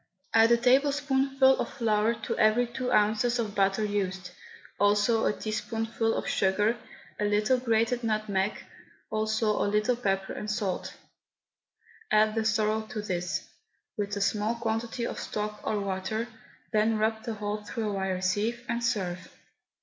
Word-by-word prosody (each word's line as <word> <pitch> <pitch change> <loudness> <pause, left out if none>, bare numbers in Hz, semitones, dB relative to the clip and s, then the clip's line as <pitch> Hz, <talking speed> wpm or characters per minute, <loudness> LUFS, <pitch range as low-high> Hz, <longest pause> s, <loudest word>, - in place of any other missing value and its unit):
Add 225 +1 +6
a 235 - +6
tablespoonful 270 +1 +3
of - - -2
flour 220 -1 +1
to - - -2
every 215 +3 +4
two 250 +1 -4
ounces 220 +2 +3
of 220 -4 -2
butter 195 +1 +2
used, 190 -3 -2 0.5
also 205 +3 +3
a - - +3
teaspoonful 225 +1 -2
of - - -3
sugar, 205 +4 +2 0.4
a 210 - +1
little 210 +5 +2
grated 230 0 +1
nutmeg, 215 -3 -1 0.5
also 215 0 +1
a - - +1
little 210 +4 +2
pepper 195 -5 -1
and 210 - -5
salt; 210 -4 -2 1.1
add 215 0 +4
the 225 -1 -1
sorrel 215 0 +2
to 215 -3 -5
this, 180 -3 -3 0.5
with 205 0 -2
a - - -2
small 210 +3 +1
quantity 230 +1 -2
of - - -4
stock 210 0 -4
or 210 - -1
water, 200 +3 -2 0.5
then 215 +1 +3
rub 220 +1 0
the 230 - -4
whole 210 0 -3
through 215 0 -3
a - - -3
wire 190 -1 -2
sieve, 215 +6 -1
and 235 0 -2
serve. 185 -7 -2
215 Hz, 150 wpm, -28 LUFS, 205-230 Hz, 1.1 s, Add